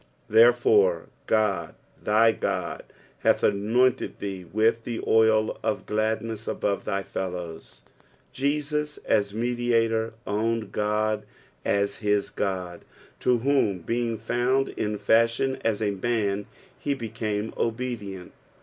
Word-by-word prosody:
"■Thertfore 110 -6 +5 0.2
Qod, 110 -3 +1 0.3
thy 110 +2 +4
Qod, - - -2 0.4
hath - - +2
anointed 115 +5 +2
thte 95 -4 -6
with 110 +2 +2
the 115 -1 -4
oil 110 -1 +3
of 110 -1 -2
gladntat 110 +1 -2
abate 100 -1 -1
thy 100 0 -1
fettovii." 90 -10 -6 0.5
Jesus 150 +2 -1
as 100 -1 +1
Mediator 115 -1 +1
owned 110 +1 -1
Qod 105 0 0 0.4
as 100 0 0
his 105 -1 0
Qod, 90 -3 -3 0.4
to 125 -1 +3
whom, 110 -10 +2
being 115 +3 -1
found 125 +4 +1
in 105 -1 -2
fi&hioTi 115 +2 +2
sa 110 - -2
a 100 - +1
man, 105 -1 -1 0.3
he 145 -1 -1
became 110 -3 -3
obedient. 110 -6 -3
110 Hz, 115 wpm, -26 LUFS, 100-115 Hz, 0.5 s, ■Thertfore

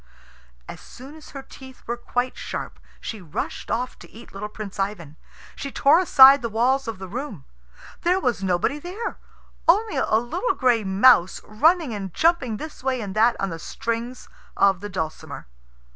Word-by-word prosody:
As - - -9
soon 265 +4 -12
as 315 -1 -14
her 275 -1 -9
teeth 260 -1 -14
were 235 - -2
quite 245 +1 -3
sharp - - -6 0.2
she 220 -3 -7
rushed 160 -5 -5
off 250 +2 -3
to - - -14
eat 230 +2 -14
little 205 +2 -6
Prince 210 -2 -8
Ivan. 195 -7 -3 0.4
She 275 - -6
tore 290 +6 +4
aside 275 -6 +8
the 235 - -3
walls 255 +4 +1
of 225 -3 -4
the 190 0 -8
room. 215 - -6 0.6
There 360 +2 +2
was 245 - -1
nobody 185 +10 0
there 380 +9 -6 0.5
only 425 +6 +3
a - - +1
little 240 - 0
gray 245 -4 +2
mouse 195 0 +4
running 310 +5 +2
and 195 -3 -5
jumping 320 -10 +2
this 310 -1 -9
way 260 -1 0
and 200 -3 -6
that 230 +2 +4
on 195 -2 -2
the 165 - -6
strings 235 +7 -5 0.3
of 195 -2 +3
the 205 +1 -7
dulcimer. 160 -5 -5
240 Hz, 175 wpm, -23 LUFS, 200-275 Hz, 0.6 s, aside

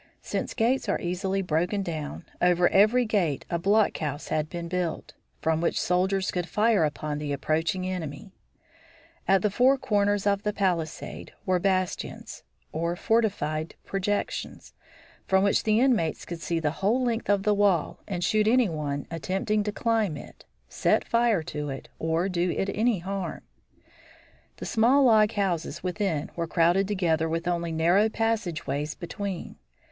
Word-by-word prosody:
Since - - -3
gates 240 -1 +1
are - - +1
easily 190 +2 -1
broken 180 +4 0
down, 160 -2 -5 0.2
over 180 0 +4
every 220 +5 +4
gate 180 - 0
a 170 - 0
block 205 +4 +3
house 150 -1 -4
had 155 0 -1
been 170 -1 -5
built, 175 -2 -3 0.3
from 160 0 +1
which 170 - +1
soldiers 190 +2 +1
could 175 -1 -3
fire 215 -4 +3
upon 150 0 -3
the 150 -1 -3
approaching 155 +5 -1
enemy. 180 0 -5 0.9
At 195 +1 +4
the 210 - +2
four 255 +6 +4
corners 205 -4 +1
of 200 -1 +2
the 210 -1 -1
palisade 175 -6 -2
were 185 -2 +2
bastions, 185 -1 -2 0.3
or 170 +2 -1
fortified 175 -8 0
projections, 195 +1 -3 0.5
from 190 0 +3
which 200 - +2
the 215 0 +3
inmates 235 - +1
could 170 -1 -7
see 170 -1 -1
the 150 -2 0
whole 230 +7 +2
length 235 -3 -1
of 200 -1 +3
the 210 0 +3
wall 200 -6 +1
and 180 -3 -3
shoot 215 +3 +2
any 240 -2 +4
one 145 -3 -3
attempting 190 +6 -1
to 210 - -1
climb 220 -7 0
it, - - -12 0.2
set - - +1
fire 230 -7 +2
to 150 -1 -4
it, 135 -1 -7
or 165 +3 0
do 180 -1 0
it 195 +3 -1
any 225 0 +2
harm. 190 0 -4 1.1
The - - -6
small 250 +5 +4
log 220 -3 +5
houses 175 -5 -2
within 180 -5 -2
were 170 -1 -2
crowded 175 +4 +3
together 165 -5 +1
with 165 +2 -2
only 170 -1 -1
narrow 175 +7 +3
passage 220 -7 -1
ways 145 +3 -2
between. 190 +1 -6
185 Hz, 160 wpm, -27 LUFS, 165-210 Hz, 1.1 s, log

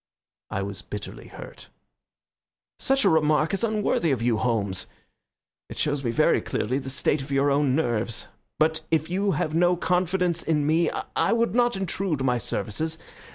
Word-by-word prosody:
I 95 - -2
was 100 -1 -5
bitterly 105 +1 -8
hurt. - - -11 1.1
"Such 270 -3 +2
a - - +6
remark 155 +1 +2
is 195 - 0
unworthy 210 -6 +1
of 135 -5 +1
you, 120 -2 +2
Holmes. 105 -6 0 0.8
It - - -9
shows 145 -2 0
me 120 - 0
very 115 - +3
clearly 130 +6 -2
the 135 - -6
state 140 +2 +1
of 135 +1 -8
your 140 +1 +2
own 140 -2 +2
nerves. 120 -6 -1 0.3
But 160 +1 +2
if 160 0 0
you 195 +1 +1
have 155 - -1
no 175 +2 +3
confidence 180 -1 0
in 150 -3 0
me 160 +3 +2 0.3
I - - +2
would 230 0 +1
not 240 -1 +2
intrude 190 -5 -2
my 125 -2 +1
services. 155 +11 -2
155 Hz, 165 wpm, -25 LUFS, 125-180 Hz, 1.1 s, a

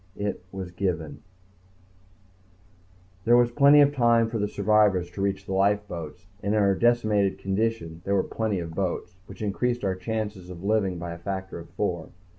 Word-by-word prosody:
It 100 -3 -3
was... 95 -2 -6
given... 90 -4 -3 2.0
There 120 +3 +5
was 120 -1 +3
plenty 140 +3 +6
of 145 0 +4
time 120 -3 +3
for 115 -1 -3
the 105 - 0
survivors 100 -4 +2
to 95 - -6
reach 100 0 -1
the 95 - -4
lifeboats, 95 -4 -1 0.2
and 100 +2 0
in - - +3
our 100 -1 +4
decimated 110 -3 +2
condition 95 -5 -2
there 100 +1 0
were 95 - +2
plenty 110 -3 -2
of 85 -2 -5
boats 90 0 -3
which - - -9
increased 120 +4 -1
our 95 - +1
chances 105 -1 -4
of 90 0 -9
living 100 -3 +1
by 85 0 -5
a 85 - -10
factor 95 0 -5
of 85 0 -11
four 85 -2 -3
100 Hz, 175 wpm, -26 LUFS, 90-110 Hz, 2.0 s, plenty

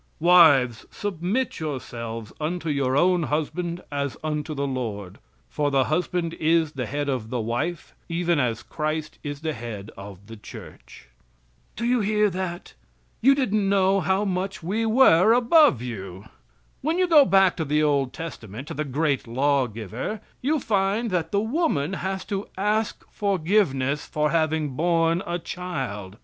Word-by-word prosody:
"Wives, 155 -9 +5
submit 205 +6 -2
yourselves 115 -7 -5
unto 165 +1 -2
your 135 -2 +1
own 180 +3 +3
husband 170 +3 -2
as 140 -1 -3
unto 150 0 -3
the 140 0 -1
Lord, 110 -8 -4 0.3
for 145 -1 -1
the 135 -2 +3
husband 170 +2 -1
is 160 -1 +2
the 130 -5 -4
head 145 +1 -3
of 125 -5 -2
the 125 0 -2
wife 120 +10 -3 0.2
even 170 -1 +1
as 120 -4 -1
Christ 155 0 -4
is 145 -1 -6
the 160 -1 -2
head 110 -4 -7
of 100 0 -11
the 115 +1 -10
Church." 105 - -12 0.7
Do 235 - -3
you 245 +1 +2
hear 210 0 +2
that? 180 -1 -5 0.5
You 275 +3 +6
didn't 215 -7 +1
know 195 0 +3
how 190 +2 +1
much 190 -1 -3
we 215 +6 -1
were 220 -4 +6
above 245 - +5
you. 100 -5 -7 0.6
When 320 +4 0
you 365 0 +3
go 310 -4 +7
back 195 -6 +4
to 165 - -1
the 150 +1 +1
old 140 -3 +1
testament, 130 -6 -8
to - - -4
the 155 - -2
great 140 -1 -1
law 135 +2 +1
giver, 115 - -5 0.2
you 300 +4 +1
find 210 0 0
that 165 -3 -1
the 200 - +2
woman 220 - 0
has 190 0 -3
to 200 0 -4
ask 210 +2 -1
forgiveness 165 -8 0
for 150 0 0
having 160 -2 +1
borne 165 +4 +1
a 175 0 -1
child. 135 - -5
160 Hz, 160 wpm, -24 LUFS, 135-195 Hz, 0.7 s, go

